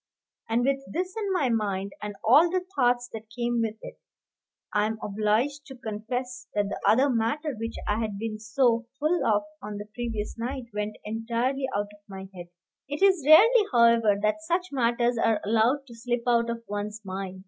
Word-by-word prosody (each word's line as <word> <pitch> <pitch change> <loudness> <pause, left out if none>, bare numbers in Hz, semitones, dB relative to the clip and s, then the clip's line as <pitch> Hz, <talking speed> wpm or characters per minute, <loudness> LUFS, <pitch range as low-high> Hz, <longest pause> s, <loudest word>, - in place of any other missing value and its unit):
And 235 +2 +2
with 275 0 +2
this 365 +2 -2
in 415 -3 -2
my 300 -9 +1
mind, 200 -4 -1
and 210 -1 -5
all 295 +10 +6
the 365 +1 -1
thoughts 245 -2 +2
that 220 -1 -8
came 240 +1 -1
with 220 -1 -1
it, - - -9 0.7
I 210 0 +2
am 220 0 -3
obliged 220 +9 0
to 265 - -9
confess 245 +2 -5
that 205 -1 +1
the - - -5
other 260 +6 +5
matter, 280 +5 0
which 225 +1 -5
I 210 +1 +1
had 215 -3 -3
been 215 0 -4
so 230 +1 +1
full 320 +4 +1
of 210 -1 +2 0.2
on 210 0 -6
the 205 - -6
previous 230 -2 -4
night, 255 +3 -3
went 210 0 -3
entirely 235 +5 -1
out 205 0 -3
of 205 - -18
my 190 0 -8
head. 175 -2 -9 0.4
It 290 +6 -2
is 375 -6 +4
rarely, 425 +7 +7
however, 230 -4 +4
that 215 +9 +1
such 345 +3 -1
matters 240 -2 +1
are 225 -2 +2
allowed 230 +6 +2
to 245 - -13
slip 240 +1 -2
out 235 -1 +2
of 230 0 -4
one's 205 +1 -4
mind. 190 0 -5
235 Hz, 190 wpm, -27 LUFS, 215-265 Hz, 0.7 s, rarely